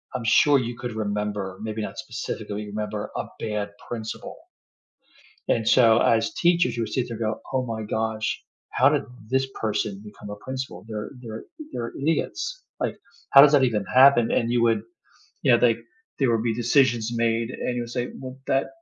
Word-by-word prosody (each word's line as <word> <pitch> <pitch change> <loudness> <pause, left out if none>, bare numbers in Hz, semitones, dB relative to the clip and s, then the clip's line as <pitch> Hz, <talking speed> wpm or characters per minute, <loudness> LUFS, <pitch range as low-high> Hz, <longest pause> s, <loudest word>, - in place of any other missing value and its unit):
I'm 115 - -3
sure 140 +6 +5
you 120 -1 -4
could 120 -2 -5
remember, 105 -3 -3
maybe 110 0 -4
not 105 0 -5
specifically 105 -5 -5
remember, 105 0 -4
a - - -2
bad 105 -2 -2 0.2
principal. 110 -2 -6 1.1
And 110 -1 +2
so 115 -3 +6
as 115 -1 +2
teachers 170 -8 +2
you 115 - -1
would 110 -1 -4
sit 125 -2 0
there 115 - -5
and 115 - -1
go, - - -17
"Oh 130 -1 +1
my 115 -2 -4
gosh, 110 0 -2 0.3
how 130 - +4
did 145 0 +2 0.3
this 130 +2 +1
person 105 -2 -1
become 105 -1 -10
a 105 - -6
principal? 130 -8 -5
They're 105 -1 -5
they're 110 -2 -7 0.3
they're 115 -1 -4
idiots. 470 - -1 0.2
Like, - - -1 0.3
how 140 - +10
does 145 0 +7
that 145 -2 +5
even 110 -5 0
happen?" 130 -2 +6
And 115 - +1
you 120 -1 +2
would 115 -3 +3 0.6
you - - +4
know, 120 - +7
like, 115 -2 +3 0.4
there 135 -4 +3
would 115 -1 +1
be 115 -1 +1
decisions 120 -1 +2
made 115 0 +1
and 125 -1 -3
you 120 - -1
would 120 - -9
say, 125 0 -2
"Well 130 0 -8
that 135 0 +2
115 Hz, 190 wpm, -25 LUFS, 110-130 Hz, 1.1 s, how